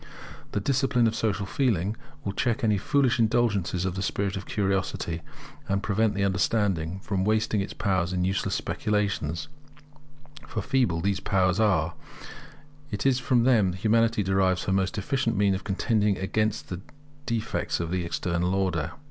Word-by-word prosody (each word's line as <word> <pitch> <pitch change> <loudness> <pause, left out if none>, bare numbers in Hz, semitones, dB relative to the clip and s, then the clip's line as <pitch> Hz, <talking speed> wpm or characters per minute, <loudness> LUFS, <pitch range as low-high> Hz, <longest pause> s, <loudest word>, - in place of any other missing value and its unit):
The - - +1
discipline 135 +1 +2
of 110 - +2
social 105 -3 -1
feeling 105 -3 0 0.3
will 100 - 0
check 120 +5 -1
any 105 -3 +3
foolish 135 +2 +2
indulgence 105 -6 +1
of 95 - -1
the 95 - -4
spirit 100 0 -1
of 95 -1 -6
curiosity, 95 -4 -1 0.5
and 100 +1 0
prevent 110 +1 +1
the 100 - 0
understanding 95 -2 0
from 95 -1 -1
wasting 110 0 +1
its 95 - -5
powers 90 -3 0
in 90 -1 0
useless 95 +1 0
speculations; 100 -7 -1 1.0
for 110 - -3
feeble 125 -11 +1
as 85 - -4
these 100 -1 +1
powers 95 0 +1
are, 90 -7 +2 1.0
it 105 - -4
is 135 -2 +4
from 125 -2 +2
them 110 -8 +4
that - - -7
Humanity 115 -1 +3
derives 95 -1 +2
her 95 - 0
most 95 +3 0
efficient 115 +1 0
means 100 -1 +3
of 95 - -3
contending 105 0 +1
against 110 +3 -1
the 90 0 -5 0.5
defects 115 -2 -1
of 85 0 -3
the 90 -1 0
External 90 +2 -1
Order. 85 -5 -1
100 Hz, 165 wpm, -27 LUFS, 95-110 Hz, 1.0 s, is